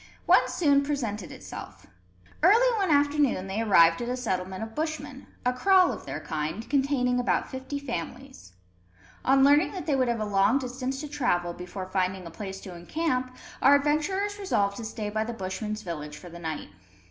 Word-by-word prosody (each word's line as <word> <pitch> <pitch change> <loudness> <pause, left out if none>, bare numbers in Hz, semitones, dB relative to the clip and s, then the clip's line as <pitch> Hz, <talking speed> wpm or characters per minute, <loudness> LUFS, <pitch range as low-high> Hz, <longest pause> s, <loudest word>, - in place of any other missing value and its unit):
One - - +5
soon 285 -4 +3
presented 240 -9 -3
itself. - - -9 0.6
Early 460 +8 +5
one 385 -3 +1
afternoon 285 -8 +2
they 195 +3 -2
arrived 170 -5 +5
at 240 - -3
a 250 - -1
settlement 190 -4 -3
of 225 0 -7
Bushmen, 315 +2 -4 0.2
a 250 - +2
kraal 370 +7 +4
of - - -10
their - - -4
kind, 155 +8 -4
containing 265 -3 +1
about 245 - 0
fifty 265 +2 -5
families. 260 - -7 0.7
On 270 +1 +4
learning 290 +6 +5
that 370 - -5
they 295 - +1
would 260 -2 +2
have 235 -1 0
a 215 - -1
long 205 +4 +3
distance 260 0 -4
to 300 - -5
travel, 175 -12 0
before 180 +2 -7
finding 185 0 -1
a 170 - -8
place 190 +2 -7
to 185 -2 -9
encamp, 255 - -2 0.3
our 280 +1 +7
adventurers 345 +9 0
resolved 200 - 0
to 230 - -6
stay 215 -1 -4
by 215 +1 0
the 235 +2 -5
Bushmen's 215 +2 -4
village 150 -4 -6
for 175 - -11
the 170 0 -10
night. 160 - -5
245 Hz, 180 wpm, -27 LUFS, 190-285 Hz, 0.7 s, our